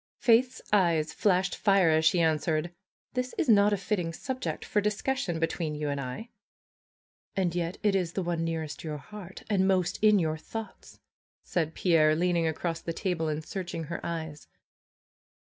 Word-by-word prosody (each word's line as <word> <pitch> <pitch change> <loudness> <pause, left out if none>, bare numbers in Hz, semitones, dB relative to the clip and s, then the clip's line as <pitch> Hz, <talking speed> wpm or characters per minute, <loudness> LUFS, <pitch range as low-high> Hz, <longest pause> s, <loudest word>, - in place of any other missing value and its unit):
Faith's 245 +2 +3
eyes 165 -5 +3
flashed 190 -2 +2
fire 195 -5 +4
as 160 0 +3
she 165 +3 +4
answered: 160 +1 +1 0.4
^^This 250 0 -2
is - - 0
not 205 -2 +6
a 205 - +2
fitting 180 -4 -2
subject 260 - -4
for 210 - +1
discussion 210 -2 -1
between 165 -1 -1
you 150 0 -2
and 140 -1 -2
I." 130 - -6 1.1
^^And 180 -3 +1
yet 175 0 -2
it 205 -2 +3
is 175 -3 0
the 190 - -1
one 170 -1 -1
nearest 160 -2 -3
your 155 -2 -4
heart, 190 +5 -10
and 190 -3 +2
most 185 0 +1
in 210 -1 +6
your 160 -4 0
^thoughts!" 225 +7 -8 0.5
said 160 -2 -2
Pierre, 155 -4 +4
leaning 170 0 +1
across 165 +1 -2
the 165 - -4
table, 170 -3 -1
and 155 0 -3
searching 175 -4 -4
her 170 +2 -6
eyes. 160 -3 -5
175 Hz, 165 wpm, -28 LUFS, 160-200 Hz, 1.1 s, not